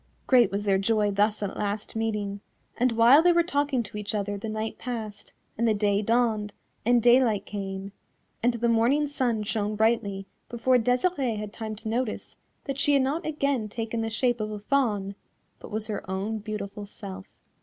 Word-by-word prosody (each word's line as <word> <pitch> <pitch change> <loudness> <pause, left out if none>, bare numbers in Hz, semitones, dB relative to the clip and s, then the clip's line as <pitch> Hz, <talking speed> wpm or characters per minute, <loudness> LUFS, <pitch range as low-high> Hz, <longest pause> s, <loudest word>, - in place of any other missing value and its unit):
Great 245 -6 +5
was 200 +1 -3
their 195 -1 +3
joy 210 0 +2
thus 210 +1 +1
at 195 - -3
last 205 +2 -3
meeting, 210 -3 -2 0.3
and 250 +1 +2
while 235 +6 +7
they 350 +1 +5
were 340 0 +4
talking 285 -6 0
to 210 - -9
each 210 +1 -3
other 205 0 -2
the 205 +2 -5
night 220 +1 -4
passed, 220 -4 -6 0.3
and 235 - +2
the 220 - +3
day 205 0 +2
dawned, 220 -2 +1 0.3
and 240 0 +3
daylight 240 -4 +4
came, 195 -1 -5 0.5
and 240 +1 +2
the 235 0 0
morning 235 +6 +3
sun 250 -6 -1
shone 210 0 -2
brightly 210 -3 +1 0.2
before 250 +2 +2
Desirée 250 0 +1
had 210 0 -6
time 220 -1 -5
to 215 - -9
notice 230 +1 -2 0.3
that 275 -1 -4
she 290 0 +3
had 275 -2 +4
not 300 +6 -1
again 280 -7 -1
taken 225 +1 -3
the 225 - -1
shape 240 +1 0
of 215 - -2
a 210 - -5
Fawn, 210 -4 0 0.5
but - - -10
was 215 0 -2
her 215 -2 -3
own 200 +4 -2
beautiful 205 -1 -6
self. 195 -1 -9
220 Hz, 185 wpm, -27 LUFS, 205-245 Hz, 0.5 s, while